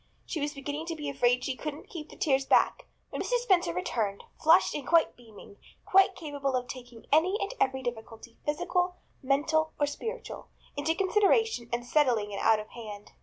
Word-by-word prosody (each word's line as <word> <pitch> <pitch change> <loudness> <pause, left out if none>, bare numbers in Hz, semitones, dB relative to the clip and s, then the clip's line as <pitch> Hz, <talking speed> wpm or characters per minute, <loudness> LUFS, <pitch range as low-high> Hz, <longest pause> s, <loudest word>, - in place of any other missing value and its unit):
She 320 - -4
was 295 +1 -2
beginning 290 +3 -5
to 335 - -3
be 295 -2 -4
afraid 250 -2 +2
she 265 - -2
couldn't 300 +2 -6
keep 315 -3 -8
the - - -12
tears 275 -3 +2
back - - +3 0.2
when - - -3
Mrs. - - 0
Spencer 370 - +3
returned, 200 +3 -2 0.2
flushed 330 +4 +5
and 285 -3 -5 0.3
beaming, 220 -4 -15 0.3
quite 385 0 +5
capable 285 -4 -3
of 250 -1 -1
taking 245 -3 -10
any 350 +7 +4
and 400 +3 -3
every 265 0 +1
difficulty, 230 -1 -7
physical, 355 +4 0 0.3
mental 310 +4 +1
or 290 - +4
spiritual, 450 +11 -6 0.3
into 305 +3 0
consideration 405 - +2
and 240 0 -2
settling 245 -7 +2
it 200 - -4
out 220 -1 +4
of 215 - -8
hand. 210 -3 -9
285 Hz, 175 wpm, -29 LUFS, 240-325 Hz, 0.3 s, flushed